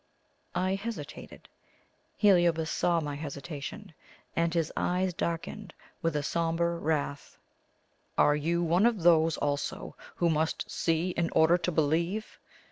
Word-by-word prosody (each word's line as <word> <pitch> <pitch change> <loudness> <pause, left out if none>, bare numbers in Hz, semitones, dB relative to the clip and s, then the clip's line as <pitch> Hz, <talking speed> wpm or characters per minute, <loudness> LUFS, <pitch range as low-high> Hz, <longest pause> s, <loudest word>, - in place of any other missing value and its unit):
I 185 +1 +1
hesitated. 220 +4 -7 0.7
Heliobas 175 -6 +4
saw 170 -1 +1
my 145 -2 -4
hesitation, 150 +6 -7 0.4
and 170 0 +1
his 165 -2 -1
eyes 180 0 0
darkened 170 +5 -4 0.3
with 165 -2 0
a 145 - 0
sombre 170 +2 0
wrath. 150 -3 -2 0.8
"Are 145 - +5
you 170 +4 0
one 175 +6 +4
of 220 -7 -1
those 165 -2 +5
also 145 -1 -3 0.2
who 170 -1 +2
must 160 +1 -1
see 165 +2 0
in 170 -1 -1
order 160 +2 +5
to 175 +1 -1
believe?" 170 +7 0
165 Hz, 125 wpm, -29 LUFS, 160-175 Hz, 0.8 s, Are